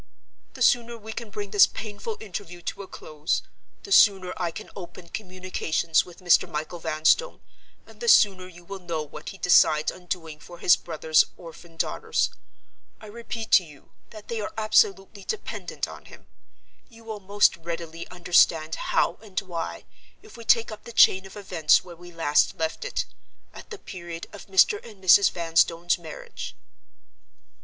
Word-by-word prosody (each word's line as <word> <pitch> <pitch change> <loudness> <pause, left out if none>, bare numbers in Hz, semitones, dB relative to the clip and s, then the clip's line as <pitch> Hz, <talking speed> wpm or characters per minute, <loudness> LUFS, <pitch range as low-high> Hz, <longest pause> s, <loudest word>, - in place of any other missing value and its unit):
The - - -1
sooner 235 -2 +2
we 220 0 -9
can 230 -1 -7
bring 205 -1 -6
this 205 - +7
painful 215 0 -6
interview 180 -4 -8
to 200 - -5
a 195 - -9
close, 155 -1 -3 0.4
the 400 - -10
sooner 195 - +5
I 175 -2 -2
can 210 +6 -9
open 175 -2 -10
communications 185 -4 -1
with 180 +1 -15
Mr. 175 -2 +4
Michael 155 +3 -5
Vanstone, 160 - +1 0.5
and - - -17
the 475 - -5
sooner 195 - +5
you 175 -1 -15
will 195 +2 -7
know 170 -4 -4
what 150 +1 -9
he 195 - -10
decides 155 -4 +4
on 180 -1 -15
doing 165 -4 -5
for 175 +3 -12
his 175 - +5
brother's 160 -1 +2
orphan 165 0 -13
daughters. 455 - -1 0.7
I - - -13
repeat 225 +1 -7
to 190 - +7
you 150 -4 -17 0.2
that 215 -2 -12
they 230 -2 -3
are - - -4
absolutely 200 -2 +2
dependent 440 - -4
on - - -12
him. - - -15 0.6
You 230 -2 -17
will 220 -2 -6
most 205 +1 +3
readily 165 0 -6
understand 170 -3 +2
how 170 - 0
and 200 -4 -4
why, 175 -4 -6 0.4
if 430 - -15
we 230 - -10
take 230 0 +3
up 215 0 -10
the 235 - -9
chain 190 -3 +5
of 190 - -13
events 180 -6 +2
where 175 -2 -11
we 175 +1 -13
last 165 -3 +2
left 160 0 -3
it—at - - -8
the 430 - -7
period 170 - -8
of 205 - -11
Mr. 195 - +4
and 215 -4 -13
Mrs. 190 +2 +7
Vanstone's 170 +1 +1
marriage." 160 -2 -8
185 Hz, 165 wpm, -25 LUFS, 165-210 Hz, 0.7 s, this